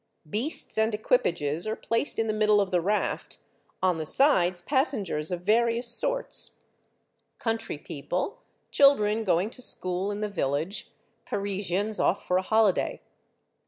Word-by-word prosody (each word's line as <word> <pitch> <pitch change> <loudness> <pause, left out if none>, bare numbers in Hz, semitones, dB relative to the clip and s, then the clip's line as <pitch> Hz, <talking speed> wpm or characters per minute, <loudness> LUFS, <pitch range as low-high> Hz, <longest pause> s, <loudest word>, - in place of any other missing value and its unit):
Beasts 220 - -1
and 220 0 +2
equipages 170 -7 0
are 220 - -1
placed 230 +6 -1
in 225 - +1
the 215 - -1
middle 215 -1 +4
of 200 -1 0
the 180 -1 +2
raft; 205 +4 -1 0.5
on 180 -3 +2
the 155 - -3
sides, 185 - +3
passengers 215 - 0
of 175 -1 -3
various 235 +3 +2
sorts, - - -2 0.8
country 225 -8 -2
people, 180 - -4 0.3
children 225 -6 +4
going 190 +2 +1
to 255 - -9
school 185 -4 -2
in 205 0 -4
the 210 - 0
village, 165 0 -2 0.4
Parisians 200 +1 -2
ofl" 190 - +3
for 180 - -1
a - - +2
holiday. 215 0 +2
210 Hz, 140 wpm, -27 LUFS, 180-225 Hz, 0.8 s, middle